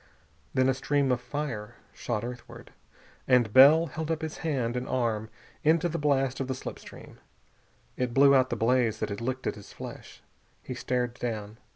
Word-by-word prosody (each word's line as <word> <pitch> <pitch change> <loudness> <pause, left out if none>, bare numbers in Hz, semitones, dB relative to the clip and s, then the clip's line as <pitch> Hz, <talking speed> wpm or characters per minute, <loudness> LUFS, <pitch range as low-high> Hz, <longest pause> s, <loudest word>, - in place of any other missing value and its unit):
Then 130 0 +3
a 135 - +3
stream 140 +1 0
of 125 -1 0
fire 125 -5 -5 0.2
shot 105 - -3
earthward, 125 0 -9 0.6
and 120 -5 +3
Bell 145 +5 +8
held 160 +1 -5
up 160 -1 -2
his 160 -1 -5
hand 130 -7 -1
and 125 0 -3
arm 110 -3 -1 0.3
into 160 +3 +3
the 170 0 -3
blast 135 -3 +1
of 135 - -2
the 130 - -2
slip - - -7
stream. - - -13 0.8
It 125 -1 -1
blew 140 +3 +6
out 130 -1 +4
the - - -1
blaze 115 -1 +2
that - - -2
had 100 +1 -5
licked 130 +2 -3
at - - 0
his 105 - -13
flesh. - - -10 0.4
He 130 - -5
stared 125 -1 -2
down. 110 -2 -4
130 Hz, 185 wpm, -28 LUFS, 120-140 Hz, 0.8 s, Bell